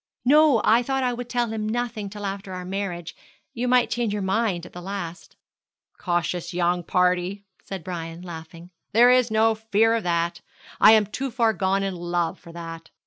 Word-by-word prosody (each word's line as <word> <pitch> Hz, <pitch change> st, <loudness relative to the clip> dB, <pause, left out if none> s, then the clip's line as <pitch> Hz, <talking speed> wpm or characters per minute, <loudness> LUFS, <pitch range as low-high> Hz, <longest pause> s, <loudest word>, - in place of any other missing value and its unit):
'No; 290 Hz, -3 st, +5 dB
I 230 Hz, +2 st, +5 dB
thought 270 Hz, +2 st, -1 dB
I 250 Hz, -1 st, +1 dB
would 245 Hz, 0 st, -6 dB
tell 240 Hz, -2 st, 0 dB
him 215 Hz, -1 st, -3 dB
nothing 230 Hz, -3 st, -3 dB
till 205 Hz, 0 st, -7 dB
after 195 Hz, -1 st, -5 dB
our 180 Hz, 0 st, -6 dB
marriage. 180 Hz, -3 st, -4 dB, 0.4 s
You 250 Hz, 0 st, -2 dB
might 250 Hz, -1 st, +3 dB
change 235 Hz, -4 st, 0 dB
your 205 Hz, -1 st, -2 dB
mind 190 Hz, -3 st, 0 dB
at -, -, -13 dB
the 175 Hz, -, -8 dB
last.' 180 Hz, -2 st, -6 dB, 0.6 s
'Cautious 175 Hz, 0 st, -2 dB
young 175 Hz, 0 st, +1 dB
party,' 180 Hz, +3 st, +1 dB, 0.2 s
said 190 Hz, -4 st, -6 dB
Brian, 170 Hz, -1 st, -6 dB
laughing. 165 Hz, 0 st, -10 dB, 0.2 s
'There 240 Hz, +3 st, +7 dB
is 250 Hz, -1 st, +4 dB
no 220 Hz, +1 st, +3 dB
fear 220 Hz, 0 st, +2 dB
of 230 Hz, -, +1 dB
that. 170 Hz, -1 st, -1 dB, 0.4 s
I 215 Hz, -, +8 dB
am 215 Hz, -1 st, +5 dB
too 265 Hz, +7 st, -4 dB
far 230 Hz, -2 st, +2 dB
gone 195 Hz, 0 st, 0 dB
in 195 Hz, -1 st, -2 dB
love 175 Hz, -1 st, -2 dB
for 170 Hz, -, -13 dB
that. 165 Hz, -1 st, -8 dB
195 Hz, 190 wpm, -24 LUFS, 175-225 Hz, 0.6 s, I